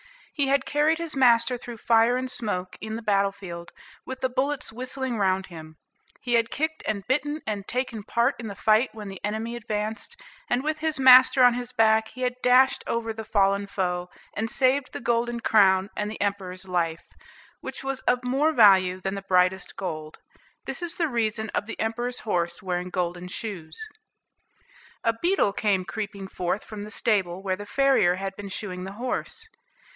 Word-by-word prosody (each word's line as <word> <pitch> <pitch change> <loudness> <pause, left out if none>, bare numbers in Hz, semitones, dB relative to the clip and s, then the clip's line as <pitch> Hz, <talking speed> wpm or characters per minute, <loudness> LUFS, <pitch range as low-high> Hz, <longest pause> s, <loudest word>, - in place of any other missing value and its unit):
He 285 -3 +1
had 275 0 +2
carried 300 +2 +2
his 335 -3 -5
master 240 -2 +4
through 240 -1 -8
fire 230 +2 +3
and 260 0 -2
smoke 185 -7 -3
in 220 +1 -4
the 230 - -6
battle 200 -2 +2
field, 175 -4 -9 0.3
with 260 0 -7
the 260 - +1
bullets 265 0 -1
whistling 255 0 -3
round 190 -1 +1
him; 160 -3 -11 0.4
he 245 - -2
had 230 -1 +3
kicked 315 +2 -2
and 200 -2 -2
bitten, 295 +4 0
and 205 -2 -4
taken 250 -3 -2
part 235 +3 +1
in 230 - -5
the 200 - -6
fight, 220 +5 +3
when 210 -2 -7
the 195 -2 -9
enemy 220 +3 -3
advanced; 220 - -4 0.3
and, 250 - +1
with 310 +1 -1
his 315 -2 0
master 255 0 +8
on 245 -1 +7
his 245 0 -4
back, 220 -2 +3
he 255 - -11
had 250 -1 +1
dashed 255 +1 +4
over 230 -1 -2
the 220 0 -6
fallen 200 -2 +1
foe, 180 -2 -2 0.3
and 225 +2 -2
saved 260 +2 +2
the - - -5
golden 235 0 0
crown 195 -3 +4
and 210 0 -2
the 220 - -7
Emperor's 190 -2 -3
life, 170 -2 -1 0.5
which - - -7
was 270 -1 -2
of 250 0 +2
more 270 +5 +2
value 190 -8 +5
than 190 +1 -3
the 200 - -4
brightest 185 -1 +1
gold. 155 -5 -5 0.5
This - - -4
is 345 -1 -1
the 330 -3 +1
reason 220 -3 -1
of 205 - -1
the - - -7
Emperor's 240 +3 -2
horse 175 -5 -2
wearing 180 -1 -2
golden 180 -1 -3
shoes. 180 -5 -5 1.2
A 230 - +2
beetle 350 - +2
came 200 -3 +1
creeping 200 0 -5
forth 185 +2 -3
from 215 -2 -8
the 210 - -7
stable, 195 -5 0
where 190 -1 0
the 205 +2 -9
farrier 265 -8 +3
had 195 +1 -5
been 205 -1 -7
shoeing 185 -2 -5
the 195 - -7
horse. 255 - -4
220 Hz, 185 wpm, -25 LUFS, 190-250 Hz, 1.2 s, master